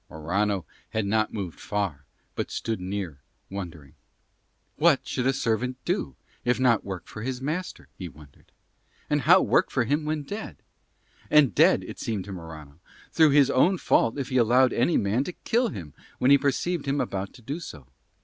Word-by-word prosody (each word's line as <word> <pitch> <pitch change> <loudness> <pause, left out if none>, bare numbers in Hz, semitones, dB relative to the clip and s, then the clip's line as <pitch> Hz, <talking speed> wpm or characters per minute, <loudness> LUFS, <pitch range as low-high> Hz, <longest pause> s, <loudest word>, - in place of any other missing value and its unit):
Morano 95 +4 -1 0.2
had 110 -2 -1
not 110 +2 +1
moved 95 -6 -5
far, 95 -9 -3 0.3
but - - -3
stood 110 -4 -3
near, 90 -6 -4 0.3
wondering. 85 -8 -7 0.8
"What 155 -2 +4
should 125 -1 -1
a - - +5
servant 125 0 -1
do 65 - -1 0.3
if 125 +1 +1
not 120 -4 +3
work 95 -2 -6
for 110 - -8
his 125 +2 -3
master?" 160 +7 -4
he 90 -3 -5
wondered. 75 -3 -18 0.6
And - - +2
how - - +6
work - - +3
for 125 - +1
him 145 +6 0
when 155 -1 -2
dead? 205 +9 -7 0.7
And 150 -4 +5
dead, - - +4
as - - -10
it - - -11
seemed 105 -5 -3
to 100 - -8
Morano, 80 -4 -10 0.3
through 160 -2 +5
his 140 -1 +5
own 180 +9 +4
fault 115 -6 +2
if 135 -3 -3
he 130 - 0
allowed 125 +2 +4
any 125 +8 +2
man 105 +6 +1
to 180 - -5
kill 240 +2 +2
him 85 - -7 0.2
when 130 - +3
he 140 - +9
perceived 145 +3 -1
him 140 +1 +1
about 95 0 -3
to 125 - -16
do 140 +8 -4
so. 75 - -9
115 Hz, 185 wpm, -26 LUFS, 95-140 Hz, 0.8 s, he